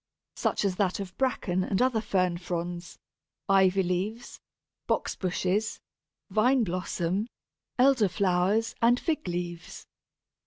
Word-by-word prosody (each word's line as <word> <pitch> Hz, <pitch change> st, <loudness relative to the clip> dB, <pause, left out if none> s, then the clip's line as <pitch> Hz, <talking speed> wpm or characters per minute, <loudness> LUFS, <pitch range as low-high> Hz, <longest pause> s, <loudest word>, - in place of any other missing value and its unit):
Such -, -, 0 dB
is 185 Hz, -2 st, 0 dB
that 190 Hz, -2 st, 0 dB
of 190 Hz, -2 st, -6 dB
Bracken 190 Hz, -8 st, 0 dB
and 190 Hz, +1 st, -1 dB
other 250 Hz, -3 st, +2 dB
Fern 185 Hz, -4 st, 0 dB
fronds, 175 Hz, -1 st, -5 dB, 0.5 s
Ivy 195 Hz, -1 st, +4 dB
leaves, 190 Hz, +6 st, -3 dB, 0.5 s
Box -, -, 0 dB
bushes, 185 Hz, +3 st, -1 dB, 0.5 s
Vine 245 Hz, +4 st, +3 dB
blossom, 185 Hz, +1 st, -2 dB, 0.5 s
Elder 255 Hz, -5 st, +4 dB
flowers, 190 Hz, +5 st, +1 dB
and 240 Hz, +2 st, +4 dB
Fig 315 Hz, -, -2 dB
leaves. 175 Hz, -1 st, -5 dB
190 Hz, 115 wpm, -28 LUFS, 180-220 Hz, 0.5 s, Ivy